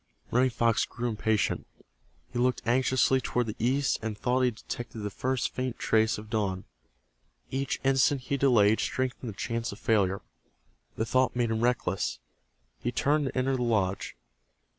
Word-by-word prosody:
Running 130 +2 +4
Fox 115 -2 +2
grew 120 0 -3
impatient. 110 -1 0 0.7
He 120 - -1
looked 125 0 +1
anxiously 130 +2 +3
toward 125 0 0
the 110 - -5
east 135 +3 +2
and 110 -2 -4
thought 125 +4 +1
he 125 - +4
detected 120 +1 -7
the 105 0 -3
first 130 +5 -1
faint 130 -2 -3
trace 110 0 +2
of 105 +1 -9
dawn. 95 -4 -1 0.9
Each 135 0 -1
instant 135 0 +3
he 135 +2 -2
delayed 115 -6 +4
strengthened 130 -2 -2
the 100 - -15
chance 115 +1 -2
of 100 - -9
failure. 100 -4 +1 0.7
The 110 - 0
thought 130 +2 +2
made 120 -2 +1
him 110 0 0
reckless. 120 -6 0 0.6
He 120 - -2
turned 145 +4 +1
to 130 - -5
enter 130 +1 +1
the 125 - -2
lodge. 105 -5 0
120 Hz, 160 wpm, -28 LUFS, 110-130 Hz, 0.9 s, Running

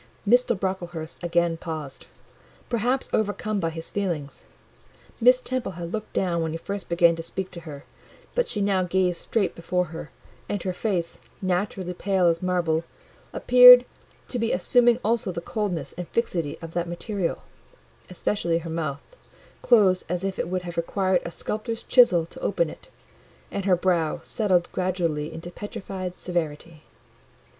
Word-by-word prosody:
Mr. 240 -2 +4
Brocklehurst 175 -4 -4
again 170 -1 +1
paused—perhaps 180 - -5
overcome 215 0 0
by 165 -3 0
his 165 0 -7
feelings. 170 -8 -3 0.7
Miss - - +6
Temple 255 - -3
had 170 -1 -6
looked 215 -1 -4
down 175 -3 0
when 160 -1 -2
he - - -2
first 200 +3 -6
began 170 -1 +4
to - - -4
speak 185 +3 -4
to 175 - -8
her; 150 -4 -9 0.5
but - - +1
she 210 - -2
now 195 -2 +2
gazed 180 -1 +1
straight 215 -5 0
before 180 +2 -1
her, 165 - -7 0.4
and 205 -4 -2
her 185 - -2
face, 180 -3 -2 0.2
naturally 185 -1 -1
pale 190 0 +1
as 165 -1 +3
marble, 175 -3 +1 0.5
appeared 250 0 +9 0.4
to 245 - -2
be 230 0 0
assuming 240 +6 +4
also 225 -3 +1
the 170 - -4
coldness 175 - -3
and 180 -1 -6
fixity 170 -8 -1
of 165 0 -8
that 175 0 -2
material; 185 +1 -3 0.7
especially 175 -2 0
her 165 0 -5
mouth, 155 -4 -3 0.6
closed 195 -6 +4
as 180 +1 -2
if 195 -1 -3
it - - -1
would 180 0 -2
have 175 -1 -7
required 185 +1 +1
a - - -3
sculptor's 215 +6 -4
chisel 185 -10 +5
to - - -12
open - - 0
it, - - -15 0.6
and 200 - -3
her 190 -2 +5
brow 175 -3 +1
settled 185 -5 +1
gradually 170 -5 -1
into 165 +2 -8
petrified 185 -2 -6
severity. 165 -2 -3
180 Hz, 155 wpm, -25 LUFS, 170-205 Hz, 0.7 s, appeared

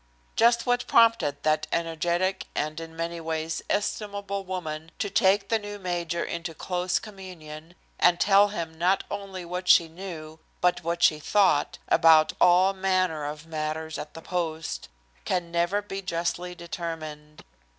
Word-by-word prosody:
Just 235 +1 +4
what 245 0 +1
prompted 230 -10 +3
that 155 0 +1
energetic 170 +3 -1
and, 155 +2 -2
in 165 0 -9
many 170 +1 -3
ways, 160 0 -3
estimable 200 -1 -2
woman, 165 -4 -5
to 205 - -2
take 195 +1 +3
the 225 - +2
new 205 0 -7
major 175 -3 -2
into 165 -1 -5
close 180 +1 -1
communion, 175 -5 -10 0.2
and 175 -1 +4
tell 200 +1 +5
him 170 -6 -5
not 185 +3 +2
only 195 -3 -6
what 180 +1 -5
she 170 - +6
knew, 160 -2 -9 0.2
but 180 -1 +1
what 170 +1 -1
she 155 - +5
thought, 170 -3 +2
about 160 -2 +5
all 180 +2 +5
manner 185 -5 0
of 150 +1 -6
matters 160 0 -4
at - - -8
the 165 - -9
post, 165 -3 -3 0.3
can 170 - -2
never 175 +4 +1
be 195 -1 -5
justly 180 0 -3
determined. 160 -3 -7
175 Hz, 150 wpm, -26 LUFS, 160-190 Hz, 0.3 s, she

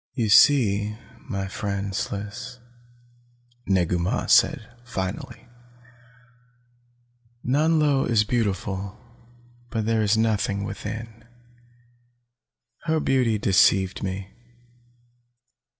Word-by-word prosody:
"You 115 -5 0
see, 105 -4 +4 0.3
my 100 -4 -3
friend 100 0 -4
Sliss," 105 +5 -5 1.1
Negu 90 -2 +1
Mah 95 +8 -1
said 135 -8 +3 0.2
finally, 95 -5 -5 2.0
"Nanlo 150 0 +2
is 110 -3 +3
beautiful, 100 -3 -2 0.7
but 110 -2 -2
there 115 0 +1
is 105 +1 +2
nothing 105 -3 0
within. 110 +2 -7 1.6
Her 160 -1 +1
beauty 125 -6 +1
deceived 95 -1 +3
me. 95 +1 -5
105 Hz, 80 wpm, -24 LUFS, 100-120 Hz, 2.0 s, see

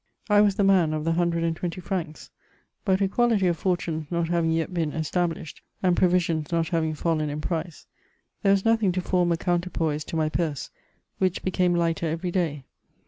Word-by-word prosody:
I 205 0 +7
was 205 -2 +3
the 200 - +1
man 185 -5 +4
of 155 - -3
the 165 - +1
120 170 0 -1
francs; 175 -4 -5 0.5
but 190 -1 +2
equality 220 0 +2
of 175 -1 +2
fortunes 175 -4 -1
^ - - -30
not 170 -1 0
having 170 -1 +1
yet 165 +2 -1
been 165 -4 -1
established^ 165 0 -2 0.2
and 180 -2 +3
proviMinis 175 -4 +1
not 165 -1 0
having 160 -2 0
fallen 155 -1 0
in 145 +1 -4
price, 165 +1 -4 0.6
there 195 - +3
was 195 +1 +2
nothing 225 -4 +3
to 185 - -1
form 180 -1 +1
a 170 - +2
counterpoise 170 -4 -1
to - - -6
my 155 -1 +1
purse, 155 -3 -2 0.5
winch 185 -2 0
became 180 -1 +1
lighter 165 -1 0
ev^ 175 +1 -3
day. 160 -6 -1
170 Hz, 185 wpm, -25 LUFS, 160-185 Hz, 0.6 s, I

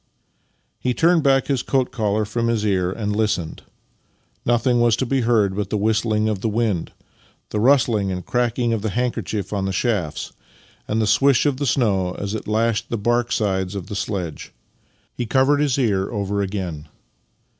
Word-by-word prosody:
He 125 -1 -1
turned 170 0 +4
back 135 -2 +3
his 135 -4 0
coat 130 -2 0
collar 105 -2 0
from 115 +3 -1
his 115 -2 0
ear 90 -3 +1
and 105 0 -3
listened. 105 -7 -1 0.8
Nothing 120 0 +2
was 120 -2 +4
to 130 - -1
be 135 +1 0
heard 110 -5 +2
but 100 -1 -2
the 105 - 0
whistl 110 +2 +1
ing 110 +1 +1
of 105 -3 -2
the 110 - 0
wind, 105 -6 -1 0.6
the 105 - -1
rustling 115 -5 +3
and 90 -1 -5
cracking 120 -1 0
of 110 - -1
the 110 - -1
handkerchief 110 -3 -2
on 100 -2 -1
the 95 - -1
shafts, 95 -7 -2 0.5
and 110 - 0
the 110 - +2
swish 135 +7 +3
of 145 -3 +1
the 140 0 -1
snow 95 -8 +1
as 100 0 -4
it 110 - -5
lashed 110 +1 0
the 115 - -1
bark 120 +3 0
sides 95 -3 -1
of 95 -3 -4
the 105 - -5
sledge. 95 -6 -4 0.6
He 120 - -4
covered 135 +4 +3
his 145 -3 +1
ear 100 -7 +1
over 100 -2 -2
again. 95 -6 -4
110 Hz, 185 wpm, -21 LUFS, 100-120 Hz, 0.8 s, turned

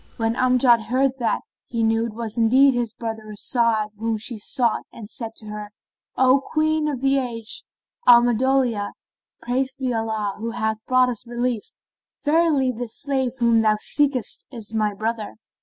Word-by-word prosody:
When 225 0 0
Amjad 250 -2 +4
heard 265 +2 +1
that, 230 -2 0 0.3
he 230 -1 -2
knew 225 +1 +2
it 215 - -9
was 225 -2 -5
indeed 255 +4 +5
his 240 -2 -1
brother 220 -2 -6
As'ad 220 0 +1
whom 225 0 -1
she 225 +3 -3
sought 230 +2 0
and 220 -3 -10
said 225 +1 -6
to 215 - -10
her, 210 0 -7 0.5
"O 260 +1 +4
Queen 310 0 +2
of 275 -4 -3
the 275 0 +3
age, 230 -3 -2 0.4
Alhamdolillah, 240 -2 +4 0.5
praised 265 +2 -1
be 255 -2 -1
Allah, 220 -3 -2
who 230 +2 -3
hath 220 -2 -2
brought 255 0 +4
us 240 -1 -5
relief! 240 -2 -3 0.5
Verily 300 -4 +3
this 235 -1 -6
slave 265 -4 -1
whom 235 -2 +3
thou 215 -1 +3
seekest 275 0 +1
is 225 -4 -6
my 215 -1 +1
brother." 215 - -4
235 Hz, 160 wpm, -22 LUFS, 220-260 Hz, 0.5 s, indeed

